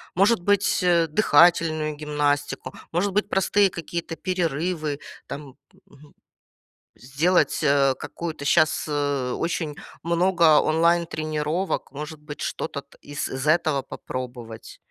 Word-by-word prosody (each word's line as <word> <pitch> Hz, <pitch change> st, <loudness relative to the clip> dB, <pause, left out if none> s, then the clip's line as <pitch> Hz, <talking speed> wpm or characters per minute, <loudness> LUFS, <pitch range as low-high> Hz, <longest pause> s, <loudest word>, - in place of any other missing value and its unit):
может 200 Hz, +2 st, +3 dB
быть, 200 Hz, +1 st, +2 dB
э, 170 Hz, -2 st, +3 dB
дыхательную 155 Hz, -3 st, +3 dB
гимнастику, 145 Hz, -1 st, -1 dB, 0.2 s
может 185 Hz, +4 st, 0 dB
быть, 210 Hz, 0 st, 0 dB
простые 195 Hz, +1 st, +3 dB
какие-то 170 Hz, -1 st, -5 dB
перерывы, 165 Hz, -4 st, -2 dB, 0.3 s
там. 140 Hz, -1 st, -8 dB, 0.3 s
Мгм. 145 Hz, +1 st, -19 dB, 0.8 s
Сделать, 150 Hz, +9 st, +1 dB
э, 140 Hz, -2 st, +4 dB
какую-то 160 Hz, -4 st, -6 dB
щас, 155 Hz, +1 st, +3 dB
э, 145 Hz, -3 st, -1 dB
очень 165 Hz, -3 st, -2 dB, 0.3 s
много 170 Hz, -2 st, +4 dB
онлайн 170 Hz, +2 st, +2 dB
тренировок. 155 Hz, +3 st, -2 dB
Может 150 Hz, +2 st, -7 dB
быть, 150 Hz, 0 st, -9 dB
что-то -, -, -4 dB
т -, -, -23 dB
из 145 Hz, 0 st, -5 dB
з 130 Hz, +2 st, -4 dB
этого 155 Hz, -3 st, +2 dB
попробовать? 120 Hz, -4 st, -8 dB
155 Hz, 115 wpm, -24 LUFS, 145-175 Hz, 0.8 s, э